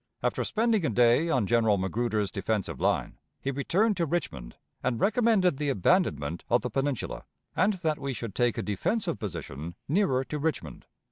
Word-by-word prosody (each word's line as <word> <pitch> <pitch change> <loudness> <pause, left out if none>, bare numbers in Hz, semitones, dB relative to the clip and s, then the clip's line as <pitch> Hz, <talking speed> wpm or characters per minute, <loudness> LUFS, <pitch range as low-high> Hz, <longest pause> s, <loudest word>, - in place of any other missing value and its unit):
After - - 0
spending 225 -3 +1
a 155 - +1
day 120 +8 +4
on 130 -9 +2
General 110 -1 +3
Magruder's 105 +2 -1
defensive 105 0 -2
line, - - 0 0.2
he 140 - -2
returned 190 - +1
to 170 -2 0
Richmond, 140 - -3 0.3
and 120 -2 -1
recommended 210 - +3
the 145 0 -1
abandonment 95 - +1
of 120 - +3
the 125 - -4
Peninsula, 135 0 -2 0.3
and 205 +3 +3
that 160 -4 -1
we 140 - -3
should 115 -4 -5
take 120 0 +1
a - - -1
defensive 170 - -1
position 85 -5 -6
nearer 145 -6 +2
to 150 +3 -5
Richmond. 140 - -3
130 Hz, 165 wpm, -28 LUFS, 105-175 Hz, 0.3 s, day